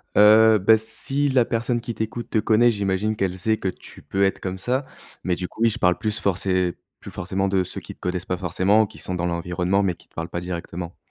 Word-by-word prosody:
Heu, 110 +1 +7
bah, 110 +4 +5
si 135 +6 -2
la 130 -3 +3
personne 115 +1 -1
qui 120 - -5
t'écoute 110 +2 -4
te 110 - 0
connaît, 115 +2 +4
j'imagine 100 0 -1
qu'elle 95 -3 -1
sait 110 +4 +1
que 95 - -3
tu - - -8
peux 100 0 -1
être 95 - +1
comme 95 0 -4
ça 125 +8 -1 0.4
mais 90 -1 0
du 90 +1 -4
coup, 115 - -12
oui, 115 - +5
je 115 +1 -4
parle 90 -3 +3
plus 105 +3 -1
forcé 95 -2 0 0.2
plus - - -10
forcément 95 +1 -2
de 95 -1 +1
ceux - - -5
qui - - -9
te - - -30
connaissent 90 0 -3
pas 90 - -2
forcément, 95 +4 +2
qui - - -15
sont 90 - -4
dans 90 -1 -2
l'environnement 90 +3 0
mais 95 -3 +1
qui - - -23
te - - -36
parlent 80 0 -4
pas 85 - -4
directement. 85 -1 -6
95 Hz, 245 wpm, -23 LUFS, 90-110 Hz, 0.4 s, Heu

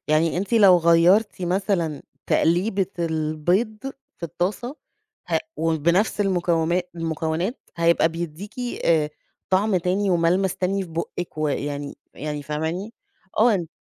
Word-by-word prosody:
يعني 155 +2 +2
أنتِ 200 +6 -3
لو 195 -5 +7
غيّرتِ 175 +5 +4
مثلًا 175 -5 -1 0.2
تقليبة 190 +3 +2
البيض 165 +7 0 0.4
في - - -35
الطاسة 195 - -3 0.5
ه - - +2 0.2
وبنفس 170 +6 +1
المكو 175 -4 +1 0.3
المكونات 165 - -2 0.2
هيبقى 170 -1 +3
بيدّيكِ 170 +5 -6 0.3
آآ، 155 -2 +3 0.4
طعم 190 +1 +3
تاني 185 +3 0
وملمس 180 +3 +2
تاني 190 +2 0
في 185 - -8
بُقِك 165 0 -5
و 155 -1 +1
يعني 145 0 -3 0.2
يعني 150 0 -4
فاهماني؟ 160 +9 -3 0.4
آه، 210 -6 +3
175 Hz, 115 wpm, -23 LUFS, 160-195 Hz, 0.5 s, لو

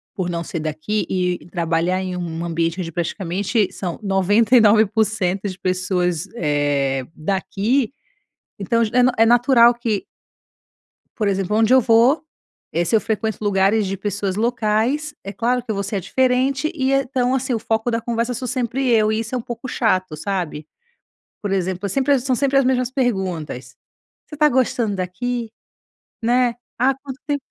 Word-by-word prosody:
por 185 -2 -2
não 170 -1 -3
ser 165 - -5
daqui 155 +7 -2
e 180 -1 0
e - - -15
trabalhar 170 +1 0
em 185 -1 -4
um 170 -1 -4
ambiente 165 +1 -1
onde 165 - -5
praticamente 185 +5 -1
são 180 -3 -5
99% 210 +3 +4 0.6
das 190 -3 -4
pessoas, 180 -3 -1
eh, 145 - 0
daqui, 205 - -1 0.7
então 230 +4 +1
já 215 - -5 0.3
é - - +7
é - - +4
natural 240 0 +5
que 235 -4 -2 1.1
Por 215 - 0
exemplo, 195 +1 0
onde 225 +3 +4
eu 260 - +7
vou, 245 +7 +4 0.5
eh, 170 +1 +1
se 225 - -1
eu 220 - +5
frequento 220 -1 -2
lugares 200 +1 +2
de 195 - -2
pessoas 200 -1 -3
locais, 235 +6 0
é 195 - -5
claro 245 +2 0
que 235 - -7
eu 215 - 0
vou 200 - -2
ser 200 +1 -3
a - - -1
diferente 260 - +1
e 265 -2 0
então, 260 -2 +1
assim, 260 -1 -1
o 230 - +1
foco 225 +2 -1
da 230 - -1
conversa 235 +1 -1
sou 255 - -4
sempre 255 +1 -1
eu, 215 -2 +4
e 220 - 0
isso 230 +3 -5
é 250 - 0
pouco 235 +2 -7
chato, 185 -8 0
sabe? 170 -3 -3 0.8
Por 205 - -2
exemplo, 190 0 -1
eu - - -1
sempre 275 +5 +2
são 255 +1 0
sempre 275 +2 +1
as 275 - +4
mesmas 255 -1 +1
perguntas: 190 - -2 0.5
"Você - - -15
está 300 0 +4
gostando 240 -4 +1
daqui?" 230 +6 -3 0.7
Né, 245 +1 +2 0.2
"Ah 260 +3 +3
quanto 270 0 -10
tempo" 285 -2 -2
215 Hz, 170 wpm, -21 LUFS, 185-245 Hz, 1.1 s, é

